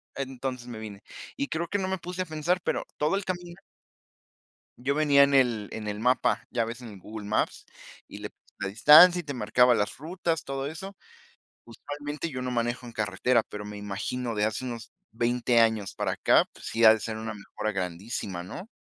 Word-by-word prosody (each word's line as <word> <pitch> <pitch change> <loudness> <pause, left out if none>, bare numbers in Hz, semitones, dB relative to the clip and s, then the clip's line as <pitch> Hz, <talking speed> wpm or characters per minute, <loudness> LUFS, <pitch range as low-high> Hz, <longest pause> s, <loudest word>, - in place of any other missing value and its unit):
Entonces 130 -2 -4
me 120 -2 -7
vine 105 -2 -8 0.4
y 280 - -1
creo 170 - -2
que 205 - -1
no 190 -1 -2
me 190 - -1
puse 180 +1 -5
a - - -11
pensar, 160 +3 0
pero - - -1
todo 150 +6 +1
el 200 - -1
camino 175 -2 -5 1.2
Yo 135 +3 0
venía 145 -2 +5
en 140 0 +2
el 120 -6 +3
en 110 -1 -6
el 105 0 -3
mapa, 125 +2 +2
ya 115 -2 +1
ves, 120 +2 -7
en 120 - -8
el 100 -2 -11
Google 105 +2 -8
Maps 105 - -1 0.4
y - - -9
le - - -6
puse - - -34
la - - -2
distancia 155 - +8
y - - -20
te 145 -2 -5
marcaba 125 +2 +4
las 105 -3 -1
rutas, 165 +2 -2
todo 135 0 -3
eso. 190 +5 -7 0.7
Usualmente 145 +6 -6
yo 130 - -4
no 125 - -2
manejo 120 +1 -1
en - - -8
carretera, 115 +2 +1
pero 105 0 -7
me 105 0 -7
imagino, 115 +4 -3
de 105 0 +1
hace 110 +4 -2
unos 120 -2 -6 0.2
20 120 +1 +2
años 110 -4 +2
para - - -1
acá, - - +4
pues, - - -13
sí 115 +1 -1
ha 110 - +10
de 110 - -2
ser 110 0 -4
una 110 0 -5
mejora 105 +1 -4
grandísima, 95 0 -4
¿no? 180 - -8
125 Hz, 205 wpm, -27 LUFS, 110-150 Hz, 1.2 s, ha